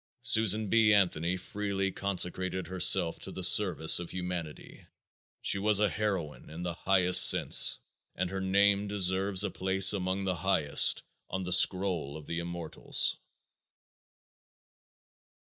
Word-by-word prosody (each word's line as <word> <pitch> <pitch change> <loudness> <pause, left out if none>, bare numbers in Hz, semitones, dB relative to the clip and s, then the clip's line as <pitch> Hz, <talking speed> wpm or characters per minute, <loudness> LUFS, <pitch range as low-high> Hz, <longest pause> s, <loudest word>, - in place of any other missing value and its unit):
Susan 110 -3 +3
B. 110 +1 +1
Anthony 90 -2 -2
freely 95 0 -6
consecrated 95 -1 -4
herself 90 -1 +2
to - - -10
the 95 - -9
service 90 -4 +4
of 85 - -10
humanity; 90 -4 -9 0.6
she 100 - +1
was 105 0 +2
a 105 -1 0
heroine 95 -8 -6
in 80 +3 -10
the 90 -1 -6
highest 90 +1 +4
sense - - +3 0.4
and 90 0 -5
her 95 0 -6
name 100 +1 -1
deserves 95 0 +1
a 105 - -5
place 95 +2 +3
among 95 0 -5
the 95 -2 -4
highest 80 -4 +2 0.3
on 95 +1 -6
the 90 0 -2
scroll 90 -6 +1
of 75 - -14
the 85 - -6
immortals. 85 -1 -2
95 Hz, 130 wpm, -27 LUFS, 90-100 Hz, 0.6 s, service